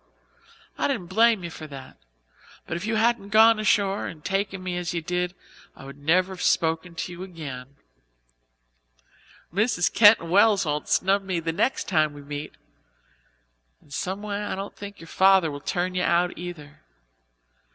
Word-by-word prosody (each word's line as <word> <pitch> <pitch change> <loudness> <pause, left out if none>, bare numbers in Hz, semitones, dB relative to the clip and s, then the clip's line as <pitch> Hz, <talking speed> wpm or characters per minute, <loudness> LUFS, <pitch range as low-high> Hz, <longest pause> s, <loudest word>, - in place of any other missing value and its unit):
I - - +2
didn't 175 0 -3
blame 225 -1 +4
you 170 - -5
for 155 -1 -9
that, 135 -2 -11 0.7
but 160 - -4
if 170 +5 -4
you 225 - 0
hadn't 220 -2 +1
gone 220 +1 +6
ashore 200 -2 +1
and 155 -2 -10
taken 195 -1 -2
me 180 -1 -3
as 175 0 -3
you 170 - -1
did 180 +1 -2 0.4
I 135 - -13
would 140 +1 -11
never 180 +6 +2
have 180 - -9
spoken 165 +1 0
to 180 - -4
you 175 +1 -9
again. 140 -8 -8 1.8
Mrs. 205 -2 +1
Keyton 210 -5 +6
Wells 200 0 +4
won't 150 -1 -3
snub 195 +2 +2
me 190 -3 -2
next 170 +11 -1
time 155 -1 +2
we 145 0 -11
meet. 145 +1 -7 1.2
And 140 - -17
some 195 +5 -3
way 205 -1 -3
I - - -3
don't 195 +1 -7
think 200 0 -9
your 165 - -12
father 190 -4 +4
will 145 0 -7
turn 180 +4 -2
you 180 - -1
out, 175 0 +1
either. 165 -4 -9
180 Hz, 165 wpm, -25 LUFS, 160-200 Hz, 1.8 s, gone